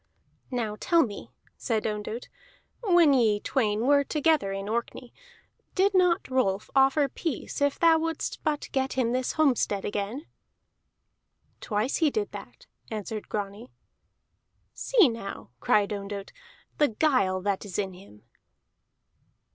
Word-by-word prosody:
"Now 225 -5 -3
tell 335 -2 +4
me," 205 -6 -7 0.3
said 225 -4 -1
Ondott, 215 +2 -4 0.6
"when 345 -8 +5
ye 220 -5 +3
twain 215 -3 0
were 285 +1 +5
together 300 -7 +1
in 195 +1 -4
Orkney, 235 +2 -4 0.6
did 395 +2 +3
not 360 -2 +3
Rolf 215 -7 0
offer 270 +2 +4
peace 285 +1 -4
if 285 -1 +2
thou 330 -1 +5
wouldst 325 0 -3
but 300 -1 -1
get 265 0 0
him 250 -3 0
this 255 0 -1
homestead 250 -10 +1
again?" 210 +9 -3 1.3
"Twice 215 +4 -1
he 320 -3 +3
did 420 +6 -2
that," - - -11 0.2
answered 215 0 -5
Grani. 205 +3 -5 1.0
"See 445 - +4
now," 225 - -6
cried 210 +6 +2
Ondott, 200 0 -6 0.5
"the 295 - +5
guile 220 -7 +1
that 200 0 -1
is 200 -4 -6
in 195 -2 -2
him!" 180 - -16
245 Hz, 130 wpm, -27 LUFS, 205-295 Hz, 1.3 s, when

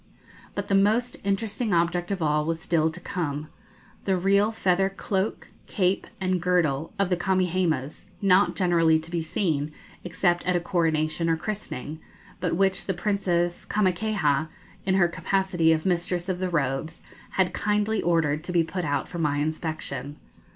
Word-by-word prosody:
But 200 0 -3
the 200 - -1
most 220 +5 +3
interesting 205 +1 0
object 175 +1 +1
of 195 -4 -1
all 150 0 +2
was 165 +1 -2
still 160 -1 +1
to 160 - -9
come 155 -4 -3 0.6
the 190 -2 +2
real 200 +4 +3
feather 195 -3 +2
cloak, 195 +1 -2 0.2
cape, 185 -2 0
and 185 -2 0
girdle 165 -5 +1
of 200 -2 +1
the 180 - +3
Kamehamehas, 175 -6 0
not 185 -2 +4
generally 165 -3 +3
to 160 +1 -6
be 170 -1 -1
seen, 155 -3 -1 0.3
except 175 0 +1
at 180 - +2
a - - +3
coronation 165 -2 0
or 165 - +2
christening, 160 - -5 0.4
but 175 -2 0
which 190 +1 +2
the 190 - 0
Princess 175 -3 0
Kamakaeha, 185 -7 +1 0.4
in 190 - +3
her 185 -2 +5
capacity 175 -1 +1
of 155 -1 +1
Mistress 175 0 0
of 180 -1 -1
the 185 0 -1
Robes, 150 0 -2 0.3
had 190 -1 +1
kindly 210 +1 +1
ordered 155 -3 +1
to 180 - -3
be 170 -2 +3
put 175 +3 -4
out 145 -2 -1
for 175 - -6
my 150 -3 +1
inspection. 150 -2 -3
175 Hz, 160 wpm, -26 LUFS, 160-190 Hz, 0.6 s, her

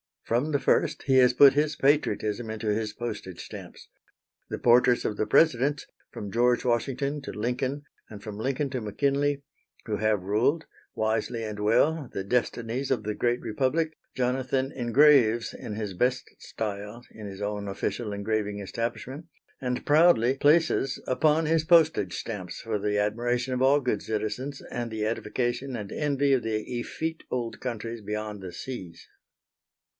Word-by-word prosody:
From 125 +7 0
the 140 - +2
first - - +1
he 135 -2 +3
has 125 -1 +6
put 140 +2 +8
his 150 +1 +1
patriotism 115 -7 +1
into 110 0 -3
his 105 0 -1
postage 105 -6 -6
stamps. - - -11 0.6
The - - -3
portraits 120 0 +4
of 105 - -2
the 110 - 0
Presidents, 145 -2 +3 0.3
from 100 -1 -7
George 120 +2 +2
Washington 135 +4 0
to - - -6
Lincoln, 125 +6 -2 0.3
and 105 -2 -10
from 105 -2 -7
Lincoln 135 +5 -1
to 130 -3 -3
McKinley, 140 +6 0 0.4
who 105 -2 -2
have 105 -2 +1
ruled, 115 - +1 0.3
wisely 110 +1 -1
and 105 -1 -5
well, 135 +7 +2
the 95 - -3
destinies 120 +3 -1
of - - 0
the 105 0 -2
great 120 +3 0
Republic, 155 +8 0 0.2
Jonathan 130 +1 0
engraves 120 -2 +4
in 105 - -7
his 105 -3 -4
best 125 +7 0
style, 105 +2 -6
in 105 -2 -9
his 100 0 -8
own 105 0 -3
official 105 +3 -3
engraving 105 0 -2
establishment, 120 - -4 0.3
and 125 -2 -3
proudly 145 -5 +5
places 145 -2 +3
upon 155 +4 +2
his 160 0 +2
postage 160 - +4
stamps 95 -6 -6
for 110 -2 -2
the 105 0 0
admiration 120 +5 0
of 125 - -1
all 140 +2 +5
good 125 -6 -1
citizens 110 +6 -3
and 120 -1 -3
the 110 -1 -2
edification 120 +4 -2
and 105 -3 -6
envy 140 -2 +1
of 130 - +3
the 110 -1 -2 0.2
effete 160 +6 -4
old 120 -2 -3
countries 115 -2 -5
beyond 105 0 -4
the 90 -2 -8
seas. 90 -6 -8
120 Hz, 155 wpm, -27 LUFS, 105-135 Hz, 0.6 s, put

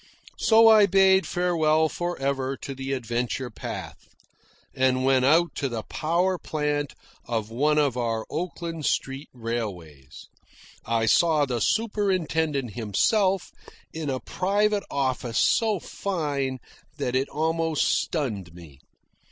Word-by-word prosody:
So 225 0 +6
I 215 -2 +7
bade 190 0 +4
farewell 160 -3 +2
for 175 +2 -4
ever 135 -1 -1
to 135 - -7
the 135 0 -5
adventure 120 0 -3
path, - - -8 0.6
and 130 0 +1
went 130 -1 +3
out 165 +5 +4
to 140 - -1
the 115 -3 -4
power 175 +3 0
plant 150 -2 -2 0.3
of 115 -2 -2
one 150 +6 +1
of 145 -5 +2
our 115 -2 -2
Oakland 165 -1 -4
street 135 +2 -2
railways. 100 - -6 0.6
I 115 -1 +1
saw 155 +5 +3
the 125 -3 -2
superintendent 165 - 0
himself, 185 - +1 0.4
in 160 -2 -4
a 130 -1 -1
private 205 +5 0
office 130 -4 -2
so 220 -3 +3
fine 145 -9 -3 0.4
that 125 - -2
it 135 +2 0
almost 160 0 0
stunned 105 - -1
me. 80 -6 -14
145 Hz, 125 wpm, -25 LUFS, 125-170 Hz, 0.6 s, I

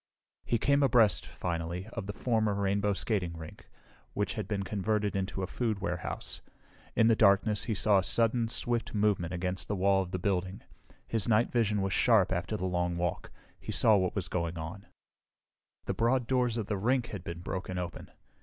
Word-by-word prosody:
He 120 - +1
came 140 +5 +3
abreast, 120 -7 +4
finally, 85 +1 -4
of 95 - -5
the 105 - -3
former 110 -2 +1
Rainbow 100 +1 +1
Skating 95 -5 -2
Rink, 80 -1 -11 0.4
which 105 - -1
had 105 -4 -4
been 100 -2 -2
converted 105 +1 -1
into 95 0 -2
a - - +1
food 110 +1 -1
warehouse. 90 -4 -4 0.5
In 110 - +4
the 115 0 +5
darkness, 105 0 +3
he 110 - -1
saw 100 +1 +4
a - - -1
sudden, 115 +2 +1
swift 120 0 -2
movement 100 -5 +1
against 90 +1 -2
the 105 - -1
wall 95 0 +3
of 95 - -5
the 95 - -2
building. 95 0 -2 0.4
His 110 -4 -1
night 110 +1 +3
vision 105 -4 +1
was 95 -1 -1
sharp 110 -7 +4
after 90 +4 -1
the 95 - -3
long 90 -1 -1
walk; 85 -1 -2 0.3
he - - -6
saw 110 - +4
what 95 -2 +1
was 95 -4 -2
going 85 -1 -2
on. 85 +5 -7 1.0
The - - -1
broad 120 +2 +2
doors 125 -2 +1
of 110 - -2
the 105 0 -2
rink 120 +4 +1
had 100 -6 -6
been 85 0 -6
broken 90 0 -4
open. 90 -1 -5
100 Hz, 190 wpm, -30 LUFS, 90-110 Hz, 1.0 s, the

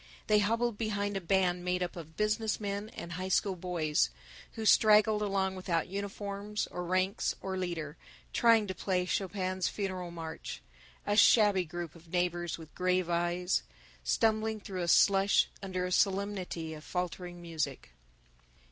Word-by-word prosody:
They 210 0 +4
hobbled 230 +2 0
behind 205 -2 -1
a 195 - -1
band 180 -1 +1
made 180 0 0
up 175 - -4
of 160 -2 -10
business 215 +1 0
men 205 0 -3
and 170 - -8
high 185 +2 -4
school 190 +1 +1
boys, 165 - 0 0.4
who 220 - -5
straggled 215 0 +5
along 195 -2 0
without 180 -2 -1
uniforms 200 +1 -4
or 180 - -4
ranks 185 +4 0
or 190 -1 -4
leader, 170 -4 -4 0.4
trying 230 -2 +5
to 190 - -4
play 185 -1 -1
Chopin's 185 -1 -1
Funeral 185 -3 -3
March 165 -2 -7 0.4
a 205 - +1
shabby 205 -4 +6
group 170 -1 -6
of 170 0 -16
neighbors 175 -1 -1
with 160 -2 -12
grave 180 -1 +1
eyes, 175 +2 +1 0.4
stumbling 220 -1 +1
through 190 -2 -5
the 175 - -2
slush 195 +3 +4
under 185 -2 -2
a 180 - -3
solemnity 190 -4 0
of 150 -1 -10
faltering 180 0 -4
music. 155 - -4
185 Hz, 150 wpm, -31 LUFS, 175-205 Hz, 0.4 s, shabby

